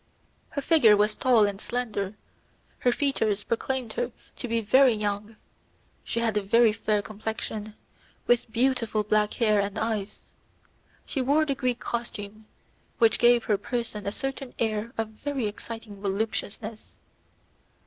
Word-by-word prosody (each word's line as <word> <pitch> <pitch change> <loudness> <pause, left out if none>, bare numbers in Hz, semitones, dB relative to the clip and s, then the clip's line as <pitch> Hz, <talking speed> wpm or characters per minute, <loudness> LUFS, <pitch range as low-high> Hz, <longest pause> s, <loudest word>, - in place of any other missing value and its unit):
Her 280 - -4
figure 240 -11 +6
was 210 +1 +3
tall 240 -4 +4
and 200 0 -3
slender, 215 -5 -3 0.6
her 245 - +3
features 225 -7 0
proclaimed 255 +1 -2
her - - -2 0.3
to 250 - -4
be 230 0 +1
very 250 +4 +5
young; 210 0 -3 0.7
she 235 - -2
had 225 -2 +1
a - - +2
very 225 +2 +4
fair 210 -1 0
complexion, 215 0 -5 0.5
with 240 -1 +2
beautiful 230 -3 +1
black 210 0 +1
hair 215 -4 +3
and 200 +1 -1
eyes. 215 -3 -2 0.8
She 270 - -2
wore 290 +5 +3
the 280 - 0
Greek 255 -2 -1
costume, 215 -2 -5 0.5
which 230 -4 +4
gave 240 -1 +5
her 205 -2 +1
person 230 -4 -3
a - - 0
certain 270 +2 -5
air 220 0 -1
of 225 -1 -1
very 265 +3 -3
exciting 210 -1 -7
voluptuousness. 215 +2 -3
225 Hz, 140 wpm, -27 LUFS, 210-245 Hz, 0.8 s, figure